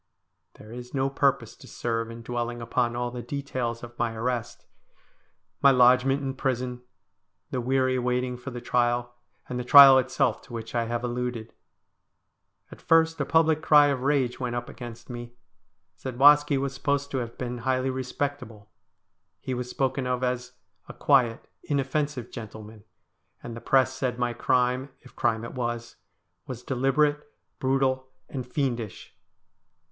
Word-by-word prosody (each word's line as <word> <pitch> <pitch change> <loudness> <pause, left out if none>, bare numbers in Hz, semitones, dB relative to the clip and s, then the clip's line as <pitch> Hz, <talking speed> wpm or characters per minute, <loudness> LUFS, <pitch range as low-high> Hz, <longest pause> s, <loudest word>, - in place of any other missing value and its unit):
There 110 - -13
is 125 +2 -8
no 135 0 0
purpose 135 -5 +1
to - - -14
serve 115 -1 -3
in 115 0 -9
dwelling 120 0 -3
upon 120 0 -1
all 120 0 -2
the 125 0 -6
details 125 -4 -4
of 120 0 -11
my 115 -1 -1
arrest; 120 0 -3 1.0
my 140 - +7
lodgment 130 +2 +4
in 135 -1 -2
prison; 125 -2 -2 0.7
the 125 - -1
weary 130 +1 +1
waiting 125 0 -1
for 125 +3 -8
the 120 -1 -7
trial; 120 0 0 0.3
and 125 - -4
the - - -2
trial 135 0 +9
itself 130 -2 0
to 130 - -14
which 115 -1 -6
I 120 -1 0
have 120 +1 -3
alluded. 120 -2 -4 1.2
At - - -12
first 165 -1 +3
a - - 0
public 160 0 +3
cry 150 -2 +6
of 135 -3 -1
rage 135 -3 +1
went 125 -2 -3
up 120 0 -4
against 120 -1 -9
me. 120 -1 -8 0.6
Zadwaski 145 +3 +4
was 135 0 -2
supposed 140 0 -1
to 130 - -1
have 120 -1 -6
been 125 -1 -4
highly 130 +2 0
respectable. 130 -5 -5 0.7
He 130 - -4
was 125 0 -4
spoken 130 0 -1
of 125 0 -1
as 125 0 -2 0.2
' - - -32
a - - -9
quiet, 125 -5 +2
inoffensive 140 -2 -2
gentleman,' 110 -2 -10 0.6
and 120 -1 -7
the 115 - -8
Press 130 +1 +3
said 125 -2 -2
my 125 -1 -1
crime, 125 +2 +1
if 125 - -17
crime 115 -1 0
it - - -8
was, 120 -2 -4 0.2
' - - -49
was 125 -2 -7
deliberate, 145 +3 +1 0.4
brutal, 130 0 +1 0.2
and 130 -3 -6
fiendish.' 120 -6 -3
125 Hz, 160 wpm, -26 LUFS, 120-135 Hz, 1.2 s, trial